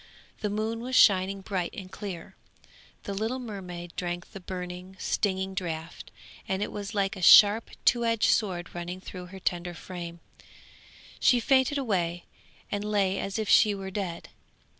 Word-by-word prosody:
The 210 - -1
moon 220 +2 -2
was 255 +2 -3
shining 195 -2 +5
bright 190 -3 -3
and 185 -1 -8
clear. 190 -3 -7 0.7
The 200 - -4
little 220 +6 -2
mermaid 180 -8 -7
drank 175 0 -4
the 195 - -8
burning, 180 0 -7
stinging 190 -2 -1
draught, 165 -3 -5 0.4
and 190 +1 0
it - - -4
was 205 +1 -6
like 195 -1 +1
a 185 - -8
sharp, 210 +4 +8 0.2
two 235 -1 +4
edged 230 -2 +3
sword 180 -5 -1
running 175 +1 -5
through 180 -1 -9
her 190 +1 -10
tender 175 -1 -2
frame; 170 -1 -7 1.0
she 245 - +5
fainted 265 +3 +3
away 175 -9 -1 0.5
and 205 0 -1
lay 200 -2 +1
as 195 - -3
if 220 -1 -2
she 210 0 +5
were 190 -1 -6
dead. 185 -4 -4
190 Hz, 160 wpm, -28 LUFS, 180-210 Hz, 1.0 s, sharp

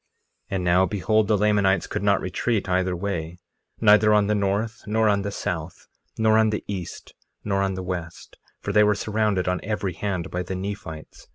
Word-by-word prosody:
1:31 - - -3
And 95 - -1
now, 90 +2 +4
behold, 105 +3 +1
the 105 -1 +3
Lamanites 100 -2 +2
could - - -4
not 100 -1 +2
retreat 100 +3 -1
either 90 0 +1
way, 85 -3 -4 0.4
neither 105 0 +5
on 105 -1 +4
the 105 - +1
north, 105 +2 -1
nor 110 +1 +2
on 100 -1 +2
the 100 - -3
south, 85 -4 -5 0.3
nor 110 0 +4
on 110 0 +4
the 105 - -3
east, 95 -4 -6 0.3
nor 100 -2 0
on 95 -1 0
the 95 - -5
west, 85 -2 -6 0.2
for 100 - -4
they 105 +1 +6
were 105 0 +3
surrounded 105 -3 0
on 90 0 0
every 100 -3 -2
hand 90 -3 -3
by 90 - -2
the 90 +1 -4
Nephites. 95 -5 -7
100 Hz, 195 wpm, -24 LUFS, 90-105 Hz, 0.4 s, they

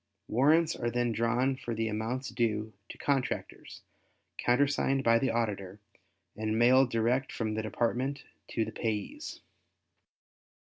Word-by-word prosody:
Warrants 155 +7 +3
are 120 - -1
then 120 0 0
drawn 120 +4 +1
for 120 -3 -5
the 110 0 -1
amounts 115 +5 -2
due 110 -2 -1 0.2
to - - -9
contractors, 135 -3 -2 0.6
countersigned 135 +1 +2
by 115 -1 +5
the 130 - +1
Auditor 105 -4 -2 0.6
and 110 0 -1
mailed 125 +2 +5
direct 120 +3 +1
from 110 -2 -2
the 110 - -1
Department 120 +5 -1 0.2
to 115 - -1
the - - -6
payees. 115 - -4
120 Hz, 130 wpm, -30 LUFS, 110-130 Hz, 0.6 s, by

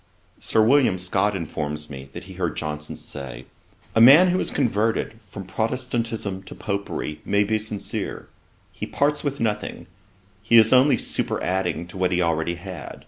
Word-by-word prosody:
Sir 110 - +2
William 125 -4 +4
Scott 95 +3 0
informs 75 -3 -4
me, 70 -1 -9
that - - -7
he - - -11
heard - - -3
Johnson 75 0 -4
say, 70 -3 -8 0.5
'A 115 - +4
man 150 +10 +9
who 180 +1 +1
is - - 0
converted 110 -2 0
from 100 -1 -9
Protestantism 115 -2 -2
to 95 - -11
Popery 100 -7 -4
may 100 0 +2
be 110 +1 0
sincere: 105 -1 -5 0.4
he - - -6
parts 145 +1 0
with 140 -1 -2
nothing: 105 -3 -2 0.6
he 115 +2 +4
is 110 +1 +6
only 130 +3 +5
superadding 90 -2 -1
to 90 +2 -11
what 90 0 +1
he 90 - +1
already 85 0 0
had. 85 -5 -8
100 Hz, 160 wpm, -23 LUFS, 85-115 Hz, 0.6 s, man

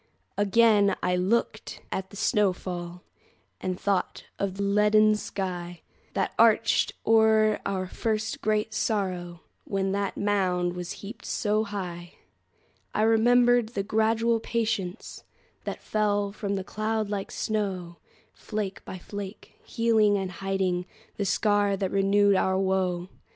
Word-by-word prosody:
Again 205 0 +4
I 180 0 +2
looked 190 +6 -1
at 190 0 -3
the - - -13
snow 205 -1 +2
fall, 175 -1 -7 0.6
And 185 -1 -3
thought 200 -2 -1 0.2
of 195 -2 -2
the 200 - -1
leaden 210 +1 +4
skyThat 180 -4 -4
arched 230 0 +4
o'er 220 -1 +4
our 190 -1 -2
first 215 +3 -2
great 215 0 0
sorrow, 185 -5 -2 0.2
When 195 -1 -1
that 200 0 -2
mound 185 -3 +1
was 180 -1 -5
heaped 210 +5 -9
so 215 0 0
high.I 180 +1 -7
remembered 240 +1 +4
the 200 -4 -3
gradual 225 +2 +1
patienceThat 215 -6 -4
fell 205 -1 0
from 200 -1 -3
that 190 -1 -4
cloud 215 0 -2
like 200 -1 -3
snow, 190 -5 -3 0.4
Flake 210 -3 -5
by 185 - -7
flake, 200 +2 -8
healing 220 -3 +2
and 190 -2 -3
hidingThe 195 +2 -3
scar 205 0 +2
that 190 -1 -2
renewed 200 +1 +3
our 190 0 +2
woe. 190 -2 0
200 Hz, 120 wpm, -27 LUFS, 185-215 Hz, 0.6 s, Again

